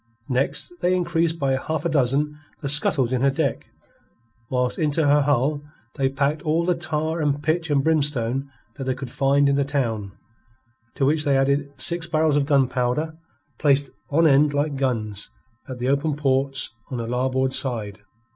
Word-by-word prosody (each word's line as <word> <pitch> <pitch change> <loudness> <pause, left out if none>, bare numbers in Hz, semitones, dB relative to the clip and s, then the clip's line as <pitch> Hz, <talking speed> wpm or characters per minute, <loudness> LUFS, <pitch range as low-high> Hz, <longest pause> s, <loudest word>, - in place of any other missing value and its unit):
Next 135 - -1
they 180 +1 +2
increased 170 -2 0
by 135 -4 0
a 130 - -1
half 155 -1 -3
dozen 150 -1 0 0.2
the 145 - -3
scuttles 135 -3 +3
in 125 - 0
her 140 - +4
deck, 135 -2 -2 0.8
whilst 125 -1 -1
into 155 0 +1
her 145 +1 +4
hull 145 +1 +1 0.3
they 135 -2 0
packed 140 +3 -1
all 160 +2 0
the 180 - +2
tar 160 -1 -2
and 145 -1 0
pitch 160 +2 0
and 140 -2 +2
brimstone 140 -4 +1 0.3
that 135 - -5
they 130 -1 -1
could 130 -2 -7
find 140 +1 +2
in 140 0 +2
the 140 - +2
town, 115 -8 -2 0.8
to 135 - +1
which 150 +2 +2
they 140 -3 +2
added 140 +1 +1
six 170 0 0
barrels 155 -2 +2
of 145 -1 +1
gunpowder, 135 +2 +1 0.4
placed 140 -2 +2 0.2
on 165 +3 +3
end 145 0 +4
like 145 0 0
guns 110 -7 -2 0.4
at 130 -2 -6
the 125 +1 -2
open 140 +2 +1
ports 135 -1 0 0.2
on 130 - -4
her 115 -1 -4
larboard 130 +2 0
side. 110 -7 -2
140 Hz, 175 wpm, -23 LUFS, 130-155 Hz, 0.8 s, her